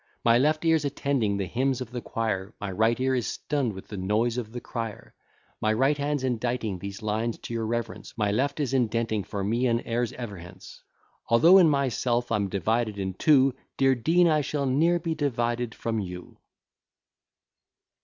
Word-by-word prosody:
My 115 0 +5
left 155 +4 +1
ear's 160 -2 +3
attending 135 -7 0
the 100 - -1
hymns 130 +5 0
of 125 -2 -6
the 120 -1 -4
choir, 110 -3 -3
My 100 -1 -4
right 110 +5 +2
ear 130 0 +1
is 125 -3 0
stunn'd 135 -7 -2
with 95 - -10
the 105 - -6
noise 105 +5 0
of 110 -3 -6
the 120 - -5
crier. 115 -3 -6 0.5
My 110 - +2
right 135 +6 +2
hand's 145 -1 -2
inditing 120 -5 -1
these 100 +2 -7
lines 110 +2 -1
to - - -8
your 115 -1 -2
reverence, 115 0 -4
My 105 -2 +1
left 135 +8 0
is 135 -3 -1
indenting 115 -4 0
for 100 +1 -4
me 115 +5 +1
and 115 -1 +2
heirs 120 0 -1
ever 115 -6 -6
hence. 95 +3 -12 0.5
Although 165 +11 +7
in 170 -4 +6
myself 125 -4 0
I'm 100 -3 +1
divided 110 +3 0
in 95 -1 -3
two, 135 - +4 0.2
Dear 135 -1 +4
Dean, 165 +8 +3
I 155 -2 +3
shall 145 0 -2
ne'er 160 +7 +3
be 165 -1 -2
divided 120 -5 -1
from 115 -1 -2
you. 90 -2 -7
120 Hz, 185 wpm, -26 LUFS, 110-135 Hz, 0.5 s, Although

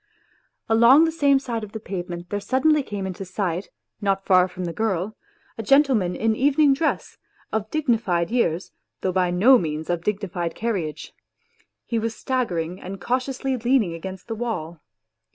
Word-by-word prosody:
Along 235 +7 +6
the 325 - 0
same 285 -4 +3
side 235 -4 -3
of 210 - -9
the 220 - -4
pavement 175 -4 -6
there 205 - -1
suddenly 265 +8 +2
came 205 -6 -5
into 190 0 -5
sight, 185 -1 -3 0.3
not 195 -1 0
far 185 -1 +5
from 180 0 -6
the 170 - -4
girl, 210 -1 -1 0.4
a - - 0
gentleman 235 -7 +3
in 220 0 +1
evening 285 +3 +4
dress, 315 +3 -2 0.3
of 220 -1 -2
dignified 225 - 0
years, 185 -8 0 0.3
though 185 - 0
by 180 -1 +1
no 225 +9 +6
means 155 0 -3
of 170 -1 -2
dignified 185 -4 -2
carriage; 195 -10 -3 0.7
he 230 - -1
was 225 0 -3
staggering 180 -9 -2
and 190 +2 -7
cautiously 260 +3 -1
leaning 240 -6 +2
against 185 +3 -8
the 225 - -3
wall. 180 -9 -4
210 Hz, 160 wpm, -23 LUFS, 180-250 Hz, 0.7 s, Along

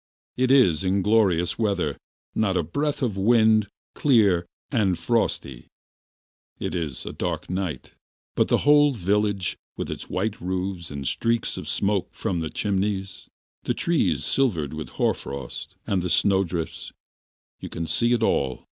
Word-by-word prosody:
It 130 0 +1
is 110 - +5
glorious 95 -2 +2
weather, 100 -9 0 0.4
not 95 -4 +1
a - - +1
breath 145 - -2
of 110 -6 -1
wind, 110 0 +4 0.3
clear, 100 - +3 0.2
and 100 - +2
frosty; 70 - -1 0.9
it - - -4
is 80 -7 -4
a - - -5
dark - - -3
night, 90 -7 -4 0.4
but - - +2
the - - +1
whole 145 -1 +6
village, 100 -2 0 0.2
its - - -5
white 105 +3 -2
roofs 90 -1 -3
and 70 -2 -5
streaks 115 - 0
of - - -6
smoke 100 -1 0
from 90 -3 -2
the 80 -1 -3
chimneys, 100 0 -2 0.4
the - - 0
trees 170 -2 +1
silvered 85 - 0
with 80 0 -6
hoar - - +1
frost, 70 -2 -7
and 95 -3 0
the 90 - -2
snowdrifts, 85 -3 0 0.7
you - - -7
can 85 - -4
see 120 +8 +2
it 120 -2 +2
all. 65 - 0
95 Hz, 145 wpm, -24 LUFS, 85-110 Hz, 0.9 s, whole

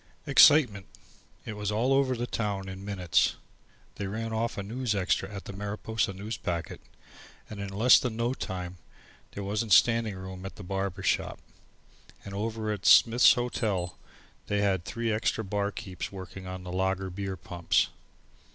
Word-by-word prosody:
Excitement! 140 -8 +6 0.6
It 115 - -5
was 105 0 -3
all 120 +6 +2
over 135 -1 +2
the 120 - -2
town 100 -5 -3
in 95 0 -7
a - - -10
minutes. 90 -7 +1 0.6
They 100 - -3
ran 110 +3 -4
off 115 +1 -1
a 100 - -3
news 115 +1 -2
extra 95 0 0
at 100 -1 -7
the - - -7
Mariposa 105 +1 -2
Newspacket, 95 -4 -4 0.7
and 105 - -7
in 100 -1 -4
less 110 +6 +6
than 120 -3 -3
no 120 +2 0
time 90 -6 -6 0.5
there 100 - -5
wasn't 105 +1 0
standing 115 -1 +4
room 95 0 -8
in 95 - -5
the 100 - -10
barber 95 0 -3
shop, - - 0 0.9
and 100 - -7
over 110 +1 -2
in 100 - -6
Smith's 115 +4 +7
Hotel 110 -7 -2 0.5
they 105 0 0
had 95 -4 +1
three 115 +1 -2
extra 110 +1 0
barkeepers 100 -2 -4
working 95 -1 -9
on 95 0 -6
the 90 - -7
lager 95 0 -1
beer 95 0 -4
pumps. 85 +1 0
100 Hz, 160 wpm, -28 LUFS, 95-110 Hz, 0.9 s, Smith's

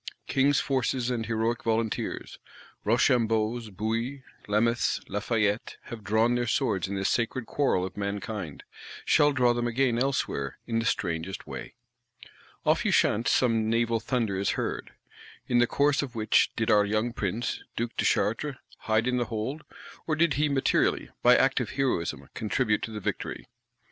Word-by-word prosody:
King's 140 +1 +3
forces 130 -2 0
and 115 -3 -2
heroic 115 +1 0
volunteers; 115 -1 -2 0.4
Rochambeaus, 115 -1 +2
Bouillés, 115 +7 -3 0.2
Lameths, 115 +3 +1
Lafayettes, 105 0 -1 0.2
have 115 -3 -7
drawn 110 +4 +2
their 120 0 0
swords 110 - 0
in 100 - -4
this 95 0 0
sacred 120 +1 0
quarrel 130 -11 +1
of 95 - -7
mankind;—shall 100 - -1
draw 125 -3 +3
them 120 0 -1
again 120 0 +1
elsewhere, 125 - -1
in 115 -1 0
the 115 - -2
strangest 85 -1 -2
way. - - -8 0.9
Off - - +3
Ushant 115 +3 +2
some 115 -3 +2
naval 115 0 +1
thunder 115 -5 -1
is 100 - 0
heard. - - -3 0.6
In 120 - +3
the 120 - +4
course 145 +3 +2
of 130 -4 -6
which 110 -1 +3
did 115 -1 +1
our 105 -1 +6
young 110 +3 0
Prince, 110 +2 -2
Duke 120 0 -3
de - - 0
Chartres, 135 +7 +1 0.2
"hide 110 +1 +1
in 125 0 +1
the 120 - +1
hold;" 120 +7 -4 0.5
or 155 - +1
did 165 -1 +3
he 150 +2 +1
materially, 135 -2 +1
by - - +7
active - - +2
heroism, 130 -11 -1
contribute 105 0 0
to - - -4
the 105 - -5
victory? - - -4
115 Hz, 155 wpm, -27 LUFS, 105-125 Hz, 0.9 s, by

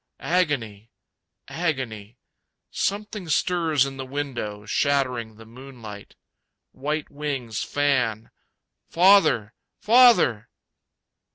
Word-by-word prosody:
Agony. 115 - -1 0.6
Agony. 125 - -4 0.5
Something 205 -3 -3
stirs 160 -3 +1
in 135 0 -7
the 135 - -5
window, 125 -7 -5
Shattering 125 -3 -1
the 110 +1 -14
moonlight. 115 -4 -11 0.6
White 150 +3 -4
wings 140 -7 -4
fan. 125 -6 -1 0.6
Father, 175 - +4 0.3
Father! 215 - +5
135 Hz, 80 wpm, -24 LUFS, 115-155 Hz, 0.6 s, Father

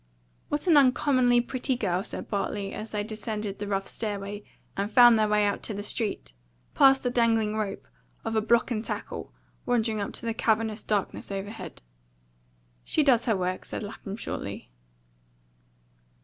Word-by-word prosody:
"What 295 +3 -1
an 335 -5 +6
uncommonly 255 -2 +4
pretty 255 +2 -1
girl!" 190 -6 -1
said - - -6
Bartley, 200 -1 -2
as 220 - -6
they 210 -1 -2
descended 215 -1 -4
the 205 - -4
rough 195 -1 -1
stairway 205 -1 -3 0.3
and 200 +1 -1
found 240 +1 +8
their 215 - +3
way 210 0 +3
out 205 - -1
to 215 - -4
the 205 - -4
street, 205 - -2 0.4
past 270 0 +5
the 245 - 0
dangling 225 -3 +2
rope 210 -2 -3 0.4
of 225 0 -2
a 220 - +3
block 235 +3 +2
and 220 -2 -1
tackle - - -5 0.4
wandering 225 -3 +1
up 200 - -1
into - - -7
the 230 - 0
cavernous 220 -1 0
darkness 205 -1 -2
overhead. 200 - -6 1.0
"She 310 - +1
does 245 -5 +4
her 225 -5 +2
work," 185 0 -2
said - - -6
Lapham 205 -1 -7
shortly. 145 - -6
215 Hz, 165 wpm, -27 LUFS, 205-240 Hz, 1.0 s, found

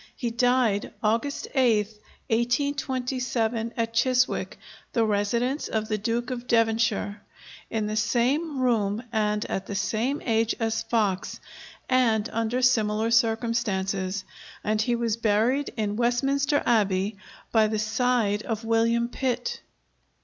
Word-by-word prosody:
He 240 -3 -3
died 240 -3 +1
August 230 +7 0
8th, 220 -5 +2 0.3
1827, 245 -2 -1
at 230 0 -1
Chiswick 255 +2 +1 0.4
(the 230 -2 +2
residence 235 +7 0
of 220 0 -2
the 215 - 0
Duke 235 +4 -2
of 250 -1 -5
Devonshire), 225 -2 +1 0.5
in 220 -1 -1
the 215 0 -2
same 255 +8 +1
room 225 -3 +1
and 210 -2 0
at 190 - -4
the 200 - -4
same 225 +8 -1
age 225 -1 +1
as 225 -1 0
Fox, 215 -5 -1 0.5
and 235 -4 +2
under 230 +3 -1
similar 220 -2 +2
circumstances; 220 -5 0 0.4
and 215 0 +1
he 240 +1 +1
was 230 -2 -1
buried 230 +6 +1
in 210 -2 -1
Westminster 275 +4 +1
Abbey 200 -3 +2 0.4
by 220 -2 +4
the 215 0 -1
side 220 -1 +1
of 225 -1 -4
William 230 +1 +2
Pitt. 265 - -2
230 Hz, 125 wpm, -26 LUFS, 215-245 Hz, 0.5 s, by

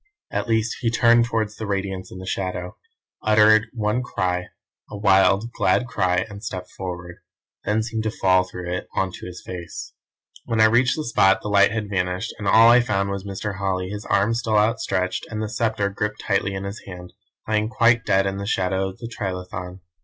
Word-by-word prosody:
At - - -2
least 110 -1 0
he 115 - +1
turned 120 0 +4
towards 110 -3 -2
the 110 - -5
Radiance 95 -2 -3
in - - -9
the 95 - -8
shadow, 90 -1 -3 0.5
uttered 110 0 +5
one 110 0 -1
cry; 90 -6 -2 0.4
a 105 - -7
wild, 100 +2 +3
glad 125 - +1
cry, 90 -6 0
and 100 0 -10
stepped 90 -3 -6
forward; 90 -2 -7 0.5
then 110 +1 +1
seemed 110 0 -3
to - - +1
fall 95 -3 +3
through 90 -1 -6
it 90 - -4
on 95 -1 0
to - - -9
his 90 0 -9
face. 90 -2 -7 0.5
"When 115 -1 -1
I 110 - +7
reached 120 +3 +3
the 155 - -4
spot 95 -4 +3
the 105 - -3
light 100 -1 +5
had 110 -1 -2
vanished, 90 +2 -2
and 105 - -4
all 115 +3 +7
I 125 +1 +7
found 100 -4 -1
was 100 0 -4
Mr. 100 0 -4
Holly, 95 -2 -1
his 105 +1 -6
arms 110 +3 +2
still 110 -2 +1
outstretched, 105 -4 0
and 110 - -4
the 110 -1 -2
sceptre 110 -2 0
gripped 105 +1 -3
tightly 100 -1 0
in 95 - -4
his 100 +2 -5
hand, 90 -1 -9 0.3
lying 110 0 +1
quite 115 -1 +3
dead 95 +1 +2
in 95 0 -2
the 100 0 -5
shadow 95 -1 0
of 95 - -11
the 115 - -7
trilithon." 90 -3 -5
100 Hz, 200 wpm, -23 LUFS, 95-110 Hz, 0.5 s, I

